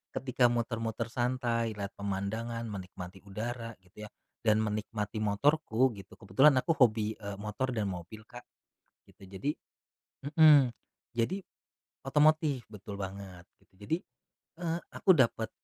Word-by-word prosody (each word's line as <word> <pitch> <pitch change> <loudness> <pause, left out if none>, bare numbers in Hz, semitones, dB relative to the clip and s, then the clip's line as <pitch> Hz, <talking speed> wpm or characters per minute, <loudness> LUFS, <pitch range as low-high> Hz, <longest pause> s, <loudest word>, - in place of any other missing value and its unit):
ketika 130 -1 +2
muter-muter 115 -1 -2
santai, 120 -2 0
lihat 100 -1 -4
pemandangan, 110 +4 -3
menikmati 95 -1 -8
udara 115 +3 -5
gitu 105 +4 -11
ya - - -19 0.3
dan 110 -1 +3
menikmati 105 0 -3
motorku 130 +3 +2
gitu. 100 -3 -12
Kebetulan 130 +8 +4
aku 145 +6 +2
hobi, 110 -3 +4
eee, 100 -1 -5
motor 105 +5 -3
dan 105 -3 -1
mobil 90 +5 -8
Kak 120 +1 -12 0.6
gitu. - - -19
Jadi 100 +10 -2 0.8
mhm, 150 -5 +8 0.5
jadi 185 +12 0 0.6
otomotif 150 -2 +3
betul 105 0 -8
banget 95 -2 -7 0.2
gitu. - - -31
Jadi, 105 +11 -1 0.7
eee, 170 0 -1
aku 190 - +1
dapat, 115 -3 +2
115 Hz, 125 wpm, -31 LUFS, 100-130 Hz, 0.8 s, mhm